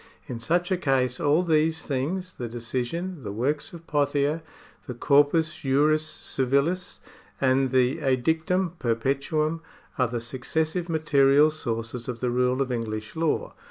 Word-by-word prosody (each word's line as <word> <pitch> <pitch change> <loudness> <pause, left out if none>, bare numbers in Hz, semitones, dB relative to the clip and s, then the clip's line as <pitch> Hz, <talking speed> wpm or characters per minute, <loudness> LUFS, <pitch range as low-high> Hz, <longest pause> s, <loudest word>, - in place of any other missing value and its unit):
In 120 - -6
such 175 +9 0
a 185 - +3
case 130 -6 +1
all 155 +2 +3
these 160 -1 +1
things 165 +7 -2
— - - -29
the 120 -2 -4
decision, 130 +9 -3
the 105 -5 -5
works 135 +8 -1
of 170 -1 -11
Pothier, 145 +1 +1 0.5
the 125 - -5
corpus 145 +5 +3
juris 150 +3 +3
civilis, 140 +6 -1 0.4
and 130 0 +3
the 130 0 +2
edictum 160 +7 +1
perpetuum 140 +7 0 0.2
— - - -24
are 125 - +3
the 120 0 -3
successive 155 +9 -2
material 150 -2 +4
sources 115 -4 -4
of 120 -2 -4
the 125 0 0
rule 125 +2 +2
of 130 - -6
English 110 -1 -4
law. 160 -1 -1
140 Hz, 150 wpm, -26 LUFS, 125-160 Hz, 0.5 s, material